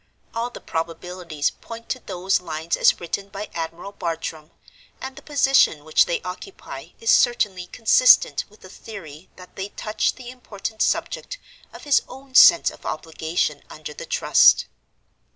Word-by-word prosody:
All 230 +1 -2
the - - -10
probabilities 165 -1 -3
point 230 0 -11
to 255 - -2
those 190 -3 -1
lines 160 -1 -3
as - - +3
written 195 +3 -4
by 200 +2 -7
Admiral 165 +3 -5
Bartram: 165 -4 -5 0.5
and 265 0 -7
the - - -11
position 270 - +3
which 155 - +4
they 170 - -2
occupy 185 - -8
is 455 - +2
certainly 200 -7 +2
consistent 225 +6 +4
with 210 - -22
the - - -12
theory 185 -6 -11
that 180 0 -15
they 195 +1 -5
touch 215 +1 -2
the 250 -1 -9
important 220 -3 -7
subject - - -1 0.3
of - - -12
his 290 -3 +3
own 265 +1 -13
sense 340 +6 +7
of - - -16
obligation 160 -2 -2
under 155 -1 -9
the - - -9
Trust. - - +5
190 Hz, 150 wpm, -23 LUFS, 165-235 Hz, 0.5 s, sense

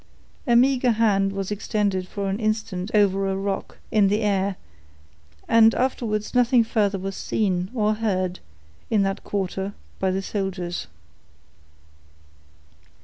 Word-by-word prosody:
A 240 - +4
meager 250 0 +4
hand 200 -3 +2
was 195 0 -4
extended 200 -2 -1
for 200 0 -4
an 195 +2 -2
instant 215 -4 -2
over 195 -2 +3
a 190 - -1
rock, 195 0 -3
in 210 -2 +4
the 205 +3 +1
air, 200 -2 +1 0.9
and 225 0 +6
afterwards 225 -5 -1
nothing 245 -1 +4
further 210 -3 0
was 195 +1 -5
seen, 185 -4 -1
or 215 -2 +2
heard, 185 -5 -1 0.5
in 215 -3 +3
that 195 0 -2
quarter, 195 0 -3 0.2
by 190 - +1
the 190 +1 -1
soldiers. 190 - -3
200 Hz, 130 wpm, -24 LUFS, 195-220 Hz, 0.9 s, and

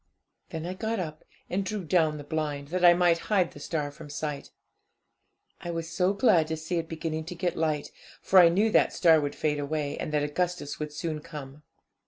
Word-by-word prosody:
'Then 160 0 -5
I 180 - -3
got 220 +3 -2
up, 155 -3 -5 0.2
and 195 +2 -1
drew 200 0 -3
down 160 -2 +2
the 145 - -7
blind, 145 -2 -3
that 180 +2 -2
I 175 -1 +8
might 175 -1 +3
hide 190 -5 +2
the - - -12
star 150 -3 -3
from 150 +1 -12
sight. 145 -1 -4 1.1
I 175 - -7
was 165 -1 -4
so 180 +3 +2
glad 195 -6 +3
to 160 0 -3
see 160 +3 -3
it 165 - -5
beginning 160 -1 -3
to 180 - -7
get 175 -1 -1
light, 155 -2 -1 0.3
for 190 - +5
I 170 -2 +8
knew 205 +6 +2
that - - +4
the - - -11
star 160 -3 +6
would 145 -1 -3
fade 150 -1 0
away, 145 0 -2
and - - -3
that 150 -1 +1
Augustus 170 0 -2
would 150 -1 -4
soon 155 0 -3
come. 150 -1 -9
160 Hz, 215 wpm, -28 LUFS, 150-180 Hz, 1.1 s, I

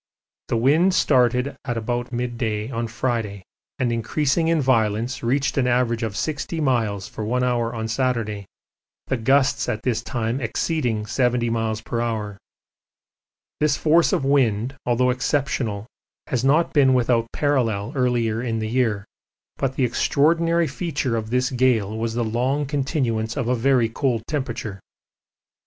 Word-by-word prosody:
The 115 - 0
wind 160 +10 +3
started 125 0 +2
at 120 -3 -3
about 120 +2 -2
mid 120 0 -3
day 110 0 -2
on 115 -1 -2
Friday, 115 -4 -2 0.3
and 125 -3 0
increasing 140 +8 0
in 165 -1 +2
violence 115 -2 +1
reached 135 +4 0
an 125 - +2
average 120 -1 +1
of 110 -3 -3
60 155 +2 -3
miles 115 -9 0
for 110 - -6
one 125 +4 0
hour 120 -2 0
on 110 0 -3
Saturday, 115 -5 -1 0.6
the 130 - -1
gusts 135 +4 +2
at 110 +3 -3
this 120 -3 0
time 120 +2 -2
exceeding 115 -2 -1
70 120 +1 +1
m.p.h. 110 -1 -2 1.2
This 150 -2 +2
force 165 +2 +3
of 135 - 0
wind, 130 -3 +2
although 125 +1 +3
exceptional, 125 -5 -1 0.4
has 125 -2 -1
not 150 +5 +3
been 135 -3 +5
without 115 -2 +1
parallel 120 -8 0
earlier 120 -4 0
in 115 -2 -2
the 110 0 -3
year, 110 -5 0 0.5
but 135 -1 -1
the 130 - +2
extraordinary 165 +7 +2
feature 155 -8 -2
of 110 -1 -3
this 125 +3 +1
gale 120 -5 +1
was 115 0 -2
the 120 - 0
long 130 +6 0
continuance 130 -6 -1
of 130 -4 -1
a 125 - +2
very 125 -1 +3
cold 115 -1 -1
temperature. 120 -8 -4
120 Hz, 145 wpm, -23 LUFS, 115-135 Hz, 1.2 s, been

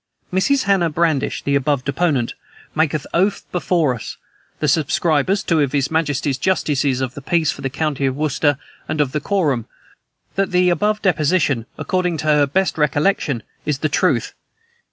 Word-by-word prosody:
"Mrs. 265 +9 +2
Hannah 195 -4 +2
Bradish, 155 -3 0
the 140 - 0
above 140 -1 +1
deponent, 140 -4 0 0.4
maketh 155 -2 0
oath 195 +4 +1
before 170 -6 +1
us, 115 - -7 0.4
the 150 - 0
subscribers, 160 +5 +1
two 165 -2 +1
of 140 -2 0
his 140 0 0
majesty's 145 -4 0
justices 145 -8 +1
of 130 -1 -2
the 140 - -8
peace 160 +2 +1
for - - -9
the 135 - -2
county 140 -1 -1
of 130 - -1
Worcester, 145 0 +1 0.3
and 155 - -2
of 145 -3 +2
the 150 - -1
quorum, 145 - 0 0.7
that 195 -1 0
the 180 0 +3
above 210 +4 0
deposition, 155 - +1
according 180 -2 -1
to 155 - -5
her 150 -2 +4
best 185 +3 0
recollection, 145 - +1 0.2
is 150 -3 -1
the 155 +2 -1
truth. 145 - +1
150 Hz, 165 wpm, -20 LUFS, 140-180 Hz, 0.7 s, her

